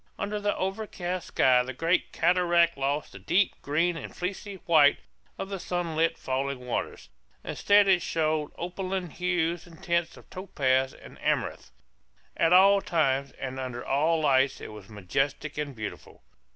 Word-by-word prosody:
Under 210 +1 -3
the 205 0 0
overcast 185 -2 -3
sky 125 -1 +4
the 130 +1 -5
great 165 +6 +1
cataract 170 -1 +3
lost 140 +2 -2
the - - -11
deep 190 +2 +1
green 165 +4 +1
and - - -8
fleecy 195 +2 -4
white 150 -3 +5 0.4
of 195 - -5
the 195 -1 -4
sunlit 165 -2 -1
falling 135 -1 -3
waters. 125 - -4 0.3
Instead 205 0 +3
it 185 -2 +4
showed 155 -2 -1
opaline 185 0 -4
hues 175 -1 -1
and 165 -2 -16
tints 170 -1 0
of - - -16
topaz 135 -8 0
and - - -14
amethyst. - - -1 0.6
At 165 - +2
all 195 +2 +7
times, 140 -6 +1
and 130 0 -6
under 125 -2 -5
all 155 +4 +2
lights, 135 -2 +3
it - - -8
was 105 -2 -12
majestic 135 +9 -2
and 145 -3 -4
beautiful. 110 - -8
165 Hz, 150 wpm, -27 LUFS, 135-180 Hz, 0.6 s, all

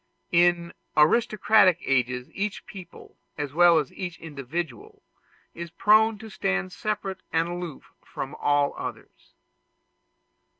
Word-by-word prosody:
In 170 0 +3 0.2
aristocratic 210 +2 +4
ages 125 -1 0
each 205 +1 -3
people, 185 -3 -12 0.2
as 145 -2 -4
well 175 +1 +6
as 150 -4 -1
each 180 -3 -6
individual, 145 -3 -6 0.5
is 170 0 -7
prone 215 +5 +4
to 220 +1 -10
stand 95 - -1
separate 200 -3 -4
and 165 +1 +1
aloof 175 -4 -7
from 135 +2 -6
all 145 -1 +1
others. - - -9
170 Hz, 115 wpm, -26 LUFS, 145-190 Hz, 0.5 s, well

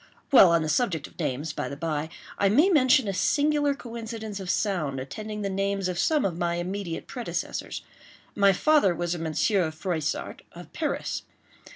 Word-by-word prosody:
While 200 -9 +9
on 170 -1 +3
the - - -2
subject 165 - 0
of - - -15
names, 145 +5 -2
by - - -3
the 140 - -7
bye, 155 0 -2 0.3
I 200 - +4
may 295 - +5
mention 265 - +4
a 195 - -1
singular 290 +6 +2
coincidence 225 -4 -6
of 190 -2 -6
sound 165 -12 0
attending 210 +10 -6
the - - 0
names 195 0 -1
of 180 -1 -3
some 305 -6 +2
of 180 -4 -1
my 170 0 0
immediate 180 0 -4
predecessors. 245 -3 -4 0.5
My 200 -1 +5
father 200 - +3
was 175 0 -1
a 175 - -4
Monsieur 165 +3 +1
Froissart, 160 -1 -3
of - - -12
Paris. - - -2
195 Hz, 175 wpm, -26 LUFS, 165-230 Hz, 0.5 s, While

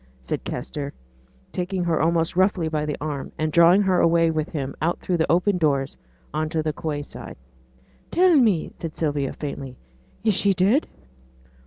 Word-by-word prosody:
said 65 - -3
Kester, 145 -1 -5 0.6
taking 180 0 -2
her 165 -3 +1
almost 165 +1 +1
roughly 185 -2 +2
by 150 -1 -2
the 150 - -2
arm, 145 -2 -4
and 155 0 -1
drawing 170 +5 +6
her 185 -2 +2
away 165 0 +4
with 155 -1 -2
him 140 -3 -4
out 170 +3 0
through 180 - -1
the 160 - +1
open 180 +2 +2
doors 140 -4 +1 0.4
on 155 +1 -1
to 160 -1 -1
the 155 -1 -1
quay 150 -2 -3
side. - - -9 0.7
'Tell 360 -1 +4
me!' 215 - +3
said 165 -2 -7
Sylvia, 145 -4 -1
faintly, 135 -3 -6 0.5
'is 220 -2 +3
she 200 +1 +3
dead?' 195 - +2
165 Hz, 170 wpm, -24 LUFS, 150-180 Hz, 0.7 s, drawing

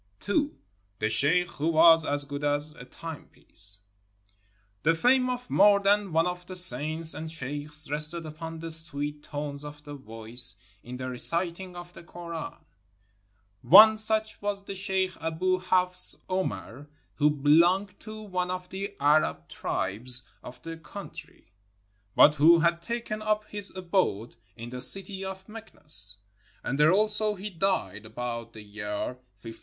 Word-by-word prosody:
II. 285 +8 +1 0.5
THE 110 +2 -1
SHEIKH 165 +10 +3
WHO 150 - -1
WAS 165 0 +6
AS 145 0 0
GOOD 145 0 -6
AS 145 +1 -1
A 125 - -12
TIMEPIECE 125 -9 -7 1.0
The 165 +2 +2
fame 255 +7 +3
of 250 0 -4
more 200 +1 +5
than 200 -1 +1
one 165 +1 +2
of 180 0 -4
the 185 - -8
saints 160 0 +1
and 160 +2 -6
sheikhs 150 0 -2
rested 150 +3 -1
upon 160 +1 -8
the 165 0 -3
sweet 150 -2 -2
tones 145 -1 -6
of 150 0 -10
the 145 - -9
voice 115 -3 +1 0.3
in 125 +1 -8
the 130 0 -5
reciting 170 +8 0
of 175 0 -10
the - - -12
Koran. 170 -1 -8 1.1
One 215 +4 +9
such 215 0 +1
was 205 -1 -2
the 195 - -6
sheikh 190 -1 0
Aboo 180 +3 0
Hafs 180 0 +3
Omar, 145 - -4 0.2
who 150 0 +3
belonged 170 +7 +2
to 215 0 -9
one 180 -3 -3
of 180 0 -5
the 200 +2 -6
Arab 145 - +2
tribes 120 +7 -2 0.2
of 125 0 -11
the 165 0 -7
country, 160 - -11 0.6
but 150 - +7
who 155 +3 +6
had 170 +1 +1
taken 235 +1 -4
up 215 0 0
his 205 -1 -7
abode 180 - -1 0.2
in 120 0 -9
the 125 0 -4
city 195 - +3
of 190 0 -7
Meknes; 150 - -5 0.5
and 135 +3 -3
there 150 +2 +6
also 210 +1 +1
he 205 +2 -7
died, 110 - -2
about 115 0 -6
the 110 - -11
year 105 0 -5 0.4
1540. 115 -1 -10
165 Hz, 150 wpm, -27 LUFS, 145-190 Hz, 1.1 s, One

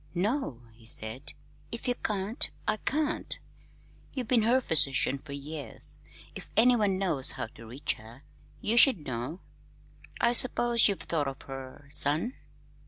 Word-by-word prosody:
"No," 190 - -1
he 110 0 -18
said. 115 +4 -6 0.4
"If 235 - -4
you 245 - +3
can't, 210 -2 -1 0.2
I 215 - +1
can't. 305 +6 -2 0.8
You've 255 -4 -3
been 245 -3 +4
her 240 +4 +3
physician 140 - +2
for 140 +1 -9
years. 140 -3 -1 0.4
If - - -9
anyone 220 -5 +4
knows 165 -9 +3
how - - -3
to 115 - -13
reach 130 +6 -2
her, 115 +6 -14 0.4
you 225 +3 0
should 235 - +6
know. 130 +7 -5 0.8
I 235 - +3
suppose 240 -1 +4
you've 200 -2 -2
thought 150 -4 -1
of 135 - -6
her 135 +1 -9
son?" 155 - +2
165 Hz, 145 wpm, -29 LUFS, -, 0.8 s, should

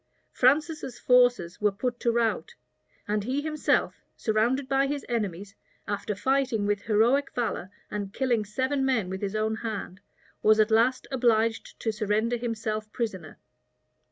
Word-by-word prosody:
Francis's 300 +1 +1
forces 245 -8 +3
were 210 0 +3
put 240 +4 -3
to 235 - +1
rout; 235 - 0 0.5
and 210 0 0
he 260 +6 -1
himself, 305 0 0 0.2
surrounded 235 +5 +1
by 270 0 +2
his 285 0 -3
enemies, 200 -4 -3 0.3
after 205 0 -2
fighting 260 -3 +1
with 205 -1 0
heroic 235 +6 +2
valor, 220 -6 -2 0.2
and 205 -2 -4
killing 240 -2 0
seven 260 +7 -1
men 225 -9 +1
with 190 - -5
his 200 0 -3
own 220 +1 0
hand, 215 -4 -5 0.4
was 215 0 +5
at 215 +1 +4
last 240 +4 +3
obliged 230 -3 +1
to 225 - -1
surrender 215 +2 0
himself 215 -2 -3
prisoner. 190 - -4
225 Hz, 145 wpm, -27 LUFS, 210-255 Hz, 0.5 s, was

